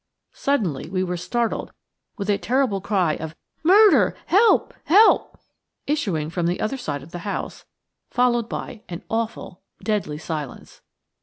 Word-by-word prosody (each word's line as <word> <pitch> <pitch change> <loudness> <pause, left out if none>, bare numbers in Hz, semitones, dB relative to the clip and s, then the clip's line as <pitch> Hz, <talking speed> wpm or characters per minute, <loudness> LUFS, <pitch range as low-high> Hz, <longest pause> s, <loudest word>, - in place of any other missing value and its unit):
Suddenly 195 - -1
we 185 0 -1
were 180 -1 -2
startled 225 +7 -2 0.4
with 200 -2 -4
a 205 -1 +2
terrible 250 -6 +1
cry 185 -6 +1
of 160 0 -7 0.3
"Murder! 400 +5 +6
Help! 425 +5 +4
Help!" 415 +7 +4 0.5
issuing 195 - -1
from 170 0 -1
the 175 - -1
other 215 +5 -1
side 145 - -4
of 155 - -14
the 175 - -6
house, 200 +3 -5 0.4
followed 240 -2 +1
by 225 - -6
an 170 -1 -6
awful, 225 -5 -3 0.2
deadly 205 -9 -1
silence. 155 -3 -7
200 Hz, 140 wpm, -23 LUFS, 170-250 Hz, 0.5 s, Murder